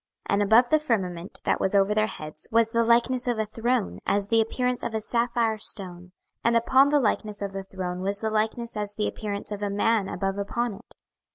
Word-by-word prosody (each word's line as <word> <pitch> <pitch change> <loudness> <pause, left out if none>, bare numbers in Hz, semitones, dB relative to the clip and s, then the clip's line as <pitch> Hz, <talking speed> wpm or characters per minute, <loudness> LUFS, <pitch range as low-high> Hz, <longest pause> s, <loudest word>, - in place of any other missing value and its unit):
26:001:026 - - +2
And 200 - +2
above 225 +4 +5
the 310 - +5
firmament 190 - -3
that - - +1
was 190 - 0
over 200 +1 +3
their 215 0 +2
heads 155 -5 -6
was 225 0 +3
the 230 0 +2
likeness 240 +2 +2
of 240 -2 0
a 220 - 0
throne, 230 +1 -1
as 200 0 0
the 225 -1 +4
appearance 250 +2 -1
of 225 - -4
a - - +1
sapphire 235 0 0
stone: 180 -4 +1 0.3
and 235 0 +3
upon 260 +4 +4
the 295 0 +3
likeness 210 -3 -1
of 200 -1 -4
the 195 0 -6
throne 185 -1 -5
was 200 +1 0
the 220 0 -2
likeness 220 +2 -1
as 205 -1 -3
the 210 - -1
appearance 205 -1 -5
of 205 -1 -5
a 205 - -1
man 205 0 +1
above 195 +1 -3
upon 235 +3 -2
it. 215 +5 -15
215 Hz, 220 wpm, -26 LUFS, 200-235 Hz, 0.3 s, above